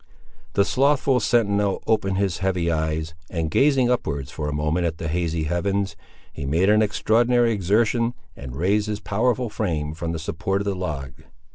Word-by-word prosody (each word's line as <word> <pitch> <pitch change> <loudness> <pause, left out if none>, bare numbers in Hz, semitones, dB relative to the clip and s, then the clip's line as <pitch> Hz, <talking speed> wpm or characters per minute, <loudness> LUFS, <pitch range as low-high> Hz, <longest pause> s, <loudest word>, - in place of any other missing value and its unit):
The 100 - +3
slothful 135 0 +2
sentinel 100 -4 +1
opened 95 -4 +1
his 95 -4 0
heavy 90 -3 0
eyes, 80 0 -2 0.2
and 80 -3 -2
gazing 135 - +3
upward 70 - -2
for 75 0 -4
a - - -2
moment 75 +4 0
at 80 -1 -4
the 80 - -4
hazy 85 0 -1
heavens, 95 +5 -1 0.4
he - - -6
made 85 +9 +2
an 105 +1 +4
extraordinary 115 +3 +2
exertion, 115 +4 +1 0.2
and 65 0 -8
raised 100 +7 +1
his 105 -1 -3
powerful 120 +3 0
frame 80 -8 -2
from 80 +1 -4
the 85 - -3
support 90 +5 -2
of - - -4
the 100 - 0
log. 75 -8 -4
95 Hz, 170 wpm, -23 LUFS, 80-110 Hz, 0.4 s, an